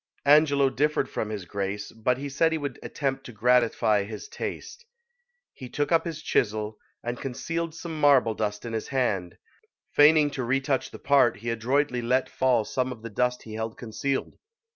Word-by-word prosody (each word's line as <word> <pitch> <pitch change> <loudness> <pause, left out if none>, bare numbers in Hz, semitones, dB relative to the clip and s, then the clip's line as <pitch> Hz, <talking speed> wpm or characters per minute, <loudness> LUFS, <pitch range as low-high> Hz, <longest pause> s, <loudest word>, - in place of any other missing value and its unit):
Angelo 140 -2 +5
differed 145 +1 +1
from 110 - -3
his 105 -4 -5
Grace, 100 +2 -4
but 115 +3 0
he 140 +2 -5
said 160 +4 +2
he 160 - 0
would 145 -4 -5
attempt 135 -2 -3
to 125 - -9
gratify 115 -2 +3
his 105 - -8
taste. 475 +1 -6 0.7
He 130 - -9
took 145 +3 -2
up 165 0 +3
his 160 -2 -5
chisel, 105 -1 0 0.2
and 120 +1 -4
concealed 165 +5 -3
some 165 -2 -6
marble 135 -6 +5
dust 105 0 -3
in 115 - -5
his 110 - -3
hand; 105 -10 -1 0.5
feigning 150 0 +6
to 130 - -3
re 130 +3 +1
touch 135 -1 -1
the - - -10
part, 135 -6 +3
he 115 +3 -3
adroitly 125 +3 0
let 125 +2 +1
fall 125 -4 +2
some 130 +2 -1
of 115 -3 -9
the 115 - -7
dust 125 +3 0
he 110 - -9
held 110 +1 -4
concealed. 125 +4 -3
125 Hz, 185 wpm, -26 LUFS, 110-145 Hz, 0.7 s, feigning